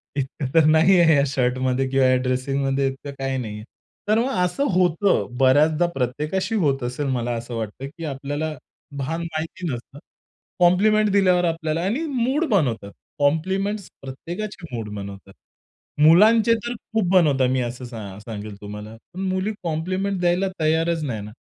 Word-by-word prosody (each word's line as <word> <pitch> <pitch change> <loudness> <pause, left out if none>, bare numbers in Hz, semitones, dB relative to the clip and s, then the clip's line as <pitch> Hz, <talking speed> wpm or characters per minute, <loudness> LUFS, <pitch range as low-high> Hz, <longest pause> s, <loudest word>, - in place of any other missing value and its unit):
इतकं 140 0 -3
तर 160 -2 +5
नाहीये 160 +1 +5
या 140 - +4
शर्टमध्ये 130 0 0
किंवा 135 0 +3
या 130 - +4
ड्रेसिंगमध्ये 135 +1 0
इतकं 135 +1 -6
काही 135 0 -1
नाहीये. 105 -3 -5 0.4
तर 215 +2 +3
मग 250 +3 0
असं 180 +10 0
होतं. 180 +2 +2
बऱ्याचदा 150 +5 +4
प्रत्येकाशी 150 - -1
होत 135 -3 +1
असेल 125 +4 -3
मला 120 -2 -1
असं 120 +1 -6
वाटतं, 110 +4 -5
की 165 - -7
आपल्याला 145 +2 -3 0.4
भान 160 +5 -3
माहिती 165 +2 -5
नसतं, 135 +4 -9 0.6
कॉम्प्लिमेंट 210 +5 +4
दिल्यावर 185 -3 +3
आपल्याला 165 -1 -1
आणि 240 - -1
मूड 265 +3 0
बनवतात. 125 - 0 0.3
कॉम्प्लिमेंट 190 +8 +1 0.2
प्रत्येकाची 170 +9 -7
मूड 110 -2 -5
बनवतात. 100 -1 -8 0.7
मुलांचे 215 +9 +6
तर 240 - -2
खूप 220 -4 -2
बनवता 145 -8 +4
मी 130 0 +1
असं 120 +1 -5
सा 105 -5 -8
सांगेल 105 -1 -7
तुम्हाला. 105 +1 -8 0.2
पण 180 - -8
मुली 190 +3 -1
कॉम्प्लिमेंट 185 +4 -2
द्यायला 180 +2 +2
तयारच 160 +1 +1
नाही 115 -7 -3
ना. 105 +1 -9
155 Hz, 150 wpm, -23 LUFS, 130-185 Hz, 0.7 s, मुलांचे